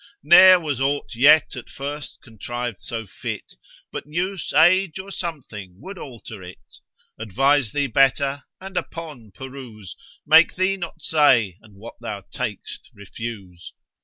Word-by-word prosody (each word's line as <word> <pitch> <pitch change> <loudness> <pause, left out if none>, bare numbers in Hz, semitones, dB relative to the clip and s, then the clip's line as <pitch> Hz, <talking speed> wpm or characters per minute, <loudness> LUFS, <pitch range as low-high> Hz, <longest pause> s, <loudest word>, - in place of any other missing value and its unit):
Ne'er 185 +4 +8
was 145 -6 -3
ought 140 0 -1
yet 145 +6 +5
at - - -9
first 145 -1 -7
contriv'd 120 -1 -6
so 115 -1 -5
fit, 95 - -7 0.4
But - - -6
use, 180 +4 -3
age, 175 +1 +4
or 190 +1 -8
something 125 - -7
would 190 - -9
alter 115 -6 -10
it; 90 0 -14 0.4
Advise 130 +3 +1
thee 145 -1 0
better, 135 +2 +1
and, 190 0 -8
upon 155 -9 -6
peruse, 125 - -10 0.3
Make - - +6
thee 185 +1 +1
not 170 -3 -8
say, 120 - +3
and 105 -3 -19
what 110 +4 -12
thou 105 -4 -5
tak'st 115 -6 -6
refuse. 100 -4 -9
135 Hz, 135 wpm, -22 LUFS, 110-160 Hz, 0.4 s, Ne'er